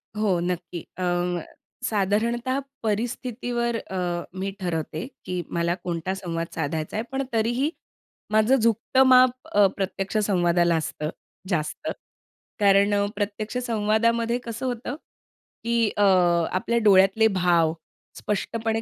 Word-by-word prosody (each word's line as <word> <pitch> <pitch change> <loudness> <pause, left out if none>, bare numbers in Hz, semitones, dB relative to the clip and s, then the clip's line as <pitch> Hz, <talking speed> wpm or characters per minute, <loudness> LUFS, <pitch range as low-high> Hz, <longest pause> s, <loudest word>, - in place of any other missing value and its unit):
हो, 205 -5 +1
नक्की. 175 0 -3 0.2
अ, 185 - -3 0.8
साधारणतः 230 +5 0 0.2
परिस्थितीवर 235 +1 -2
अ, 180 -4 -3 0.2
मी 195 +1 -2
ठरवते, 165 -2 -3 0.2
की 180 -1 -2
मला 170 +1 0
कोणता 175 +1 -2
संवाद 170 -3 -4
साधायचा 155 0 -3
आहे 220 - -1
पण 270 +1 -1
तरीही, 240 +6 +1 0.6
माझं 215 +4 +4
झुकतं 230 +3 +3
माप 255 -1 +7 0.2
अ, 205 -1 +5
प्रत्यक्ष 195 +1 -2
संवादाला 175 -3 +2
असतं 155 -1 -3 0.4
जास्त. 155 -5 -2 0.7
कारण 200 0 +4
अ, 200 0 +2
प्रत्यक्ष 210 +3 -3
संवादामध्ये 230 +1 +1
कसं 235 +3 -5
होतं, 245 +2 -3 0.7
की 230 -1 +2
अ, 205 - +3 0.5
आपल्या 235 +6 0
डोळ्यातले 195 +3 +6
भाव 175 -5 +2 0.4
स्पष्टपणे 225 +2 -2
205 Hz, 115 wpm, -25 LUFS, 180-230 Hz, 0.8 s, माप